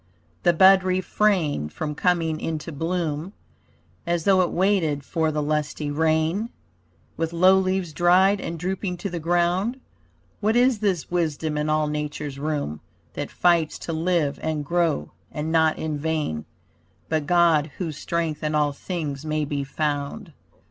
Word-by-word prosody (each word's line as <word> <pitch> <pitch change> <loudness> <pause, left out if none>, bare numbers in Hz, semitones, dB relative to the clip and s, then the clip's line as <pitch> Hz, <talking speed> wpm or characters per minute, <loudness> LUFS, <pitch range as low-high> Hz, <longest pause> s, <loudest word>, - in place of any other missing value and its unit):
The - - +4
bud 190 +2 +6
refrained 185 - +1
from 150 - -4
coming 165 -1 +1
into 160 0 -4
bloom, 165 +2 -2 0.7
As 170 -1 0
though 190 0 +4
it 175 - +1
waited 175 -7 +1
for 160 +2 0
the 150 -1 -1
lusty 150 0 -2
rain, 160 +7 +1 0.7
With 165 0 -2
low 185 +3 +5
leaves 185 -3 -1
dried 185 +4 +4
and 165 - -4
drooping 180 +1 -3
to 195 +2 -5
the 175 - -3
ground. 175 +8 +1 0.6
What 215 +2 +1
is 245 -2 +4
this 190 -7 -1
wisdom 160 -3 -1
in 150 +1 -1
all 155 0 +2
nature's 150 -2 -4
room 145 - -3 0.3
That 145 - -4
fights 170 -3 +2
to 165 - -5
live 160 -3 0
and 155 -2 -2
grow, 170 - 0 0.2
and 150 +2 -3
not 160 -1 +3
in 155 -2 -3
vain, 150 - -2 0.6
But 155 -2 -1
God, 165 -3 +4
whose 165 -5 -3
strength 165 -3 -2
in 150 0 0
all 150 -1 +2
things 150 -3 -4
may 155 -1 -1
be 140 -1 -2
found. 150 +6 -3
160 Hz, 150 wpm, -24 LUFS, 150-180 Hz, 0.7 s, bud